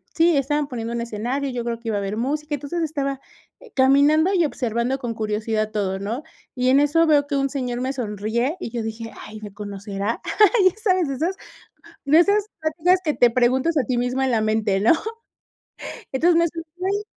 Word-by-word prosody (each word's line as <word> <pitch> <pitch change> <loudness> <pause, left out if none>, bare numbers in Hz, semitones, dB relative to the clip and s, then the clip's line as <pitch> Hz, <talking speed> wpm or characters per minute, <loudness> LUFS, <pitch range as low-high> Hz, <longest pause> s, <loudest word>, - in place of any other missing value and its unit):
sí, 330 0 +4
estaban 290 +1 0
poniendo 235 -3 -5
un 235 - -2
escenario, 245 +5 -3
yo 245 -1 -3
creo 235 -1 -3
que 230 -1 -5
iba 210 - 0
a - - 0
haber 200 +2 -3
música, 295 +4 -2
entonces 290 +5 -4
estaba 280 -4 -2 0.6
caminando 285 +7 +4
y 350 -3 +3
observando 245 -1 -1
con 240 -3 -3
curiosidad 215 0 -2
todo, 195 -3 -2
¿no?, 230 +9 -4 0.3
y 250 0 +1
en 270 +2 +5
eso 315 +3 +3
veo 290 -2 +4
que 285 - -2
un 275 0 +1
señor 250 -3 -3
me 265 +2 -1
sonríe 235 - -2
y 230 - -5
yo 235 -2 -3
dije: 225 0 -6
"Ay, 215 0 -9
¿me 205 -2 -9
conocerá?", 205 +1 -4 0.5
ya - - -12
sabes, 370 -5 +2
de - - -2
esas 340 +7 -1 0.7
de 300 +4 +5
esas 405 +3 +3 0.2
pláticas 330 +4 +2
que 300 - 0
te 240 -1 +4
preguntas 255 +7 +2
a 260 - +1
ti 250 0 -1
misma 250 +2 0
en - - 0
la 225 - +2
mente, 215 -2 +1
¿no?, 225 - +5 1.2
entonces, 335 +5 +3
le 335 - +4
sonreí, 350 +5 -4
260 Hz, 195 wpm, -22 LUFS, 225-305 Hz, 1.2 s, en